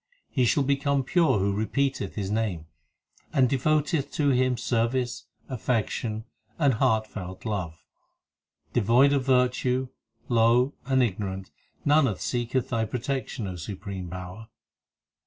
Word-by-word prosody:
He 130 -3 +2
shall 140 +4 +3
become 140 0 +1
pure 165 -1 +3
who 100 +1 +1
repeateth 135 +6 -1
His 100 -2 -3
name, 105 -7 -1 0.7
And 130 -2 +4
devoteth 150 +3 +1
to 150 -3 +2
Him 130 -1 +2
service, 120 +1 -1 0.2
affection, 110 -3 -2 0.3
and 145 -5 +3
heartfelt 105 -4 -1
love. 90 -7 -4 0.9
Devoid 120 +5 +4
of 140 -2 +1
virtue, 125 0 +2 0.4
low, 120 +3 +3
and 130 -1 +3
ignorant 95 -3 -3 0.3
Nanak 145 -8 +3
seeketh 125 +1 -1
thy 115 -4 0
protection, 125 0 -3
O 90 -1 -5
Supreme 95 0 -6
Power. 90 +4 -8
120 Hz, 120 wpm, -26 LUFS, 105-135 Hz, 0.9 s, And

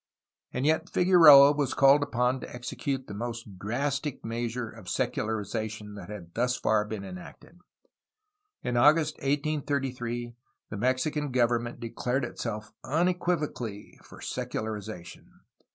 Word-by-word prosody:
And 130 - -2
yet 155 +1 +1
Figueroa 160 -6 +8
was 145 -2 -1
called 140 +1 +6
upon 125 -1 0
to - - -9
execute 130 +2 -4
the - - -8
most 115 -3 -6
drastic 140 +7 -2
measure 120 +1 -3
of 110 -5 -11
secularization 110 0 -2
that 100 -3 -9
had 90 -5 -9
thus 125 +2 0
far 105 -1 +2
been 105 -2 -5
enacted. 95 - -11 1.0
In 120 -1 -1
August 150 +4 +4
1833 135 -5 -2 0.4
the 105 - -4
Mexican 135 +6 0
government 120 -1 +1
declared 125 +2 -2
itself 110 -3 -5
unequivocally 155 - -1
for - - -14
secularization. 105 -5 -6
120 Hz, 120 wpm, -28 LUFS, 110-145 Hz, 1.0 s, Figueroa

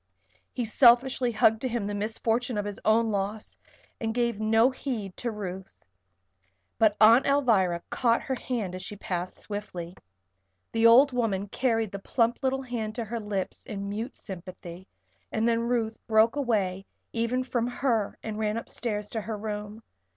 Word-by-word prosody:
He 245 - -2
selfishly 245 +2 +4
hugged 220 0 +3
to 260 - 0
him 235 -3 -2
the 205 - -3
misfortune 225 +3 -1
of 205 - -1
his 205 -1 -5
own 225 +1 +3
loss 205 +2 -3 0.4
and 225 0 -2
gave 235 -3 0
no 225 +3 +4
heed 230 -8 -5
to 245 - -2
Ruth. 190 -3 -7 0.9
But 215 -2 +4
Aunt 230 +5 +7
Alvirah 215 -12 +2
caught 235 -2 +2
her 265 - -2
hand 235 -7 -3
as 185 - -6
she 205 - -6
passed 180 -2 -4
swiftly. 185 -5 -6 0.8
The 225 0 +4
old 260 +5 +7
woman 205 -5 -1
carried 225 -3 0
the 200 - -5
plump 230 +3 +1
little 270 0 0
hand 225 -4 -4
to 235 - -3
her 230 +2 -4
lips 205 -3 -4
in 200 -1 -5
mute 220 +6 -4
sympathy, 185 -1 -9 0.4
and 225 +1 +1
then 230 -1 +2
Ruth 230 -2 -1
broke 220 +2 +4
away 200 -8 -1 0.3
even 235 +2 0
from 240 -2 -1
her 245 -4 -1
and 215 -1 -4
ran 215 0 0
upstairs 210 -3 -4
to 220 - -2
her 215 +1 -4
room. 210 +1 -6
220 Hz, 165 wpm, -27 LUFS, 205-240 Hz, 0.9 s, Aunt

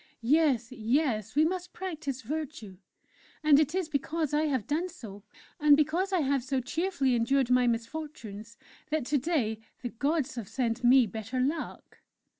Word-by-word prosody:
_'... - - -27 0.2
Yes 260 -2 +2
yes 230 -2 0
we 305 +2 +5
must 360 +1 -3
practise 310 -8 -5
Virtue; 260 - -5 0.6
and 300 -2 +6
it 310 +2 +1
is 375 -3 0
because 310 +1 -2
I 300 +1 +2
have 260 -7 -1
done 330 +5 -1
so, 220 - -10 0.4
and 295 -1 +6
because 330 +6 +1
I 370 -3 +2
have 275 -2 +1
so 265 +1 -1
cheerfully 300 0 0
endured 250 +2 +2
my 250 0 +4
misfortunes, 230 -3 -5 0.3
that 310 -4 -1
to 290 +2 +1
day 245 -8 0 0.2
the 245 - -2
Gods 285 +4 -1
have 220 -5 -5
sent 240 -2 -1
me 250 +1 +6
better 220 +4 -5
luck!" 295 +5 -3
275 Hz, 165 wpm, -29 LUFS, 235-310 Hz, 0.6 s, and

